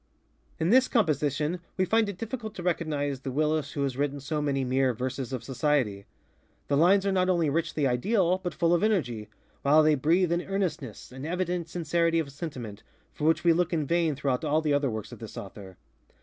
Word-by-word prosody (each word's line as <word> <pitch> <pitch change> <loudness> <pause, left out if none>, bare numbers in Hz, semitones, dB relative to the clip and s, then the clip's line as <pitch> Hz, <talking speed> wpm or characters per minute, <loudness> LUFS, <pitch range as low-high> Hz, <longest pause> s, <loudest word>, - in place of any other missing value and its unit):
In 165 +4 +1
this 260 +2 +6
composition 155 - +1 0.2
we 185 - +2
find 220 +2 +2
it 200 - -6
difficult 225 -1 -5
to 180 - -6
recognize 150 -6 -1
the 135 - -5
Willis 150 +1 0
who 140 - -1
has 135 -2 -1
written 145 0 -1
so 150 +2 -3
many 140 -2 0
mere 130 -1 +1
ŌĆ£verses 130 +1 -4
of 125 -3 -4
society. 130 -5 0
ŌĆØ - - -18 0.7
The 140 - +2
lines 190 +5 +4
are 200 - +2
not 185 -1 +2
only 170 -5 +2
richly 155 -1 0
ideal, 180 - +2
but 175 -3 -5
full 170 0 +2
of 170 - +2
energy, 125 - 0 0.3
while 150 +3 +5
they 155 0 +4
breathe 165 +5 +2
an 170 0 +1
earnestness, 180 - -4
an 130 +1 -9
evident 175 0 -2
sincerity 170 0 +1
of 155 -4 -1
sentiment, 125 - -7 0.3
for 150 - -4
which 160 0 +3
we 170 -1 +5
look 175 +1 +1
in 155 -3 0
vain 165 -1 +1
throughout 135 -2 -1
all 155 0 +2
the 155 -2 0
other 145 -1 +2
works 110 -2 -5
of - - -10
this 110 -3 -9
author. 95 -1 -9
155 Hz, 205 wpm, -27 LUFS, 135-175 Hz, 0.7 s, this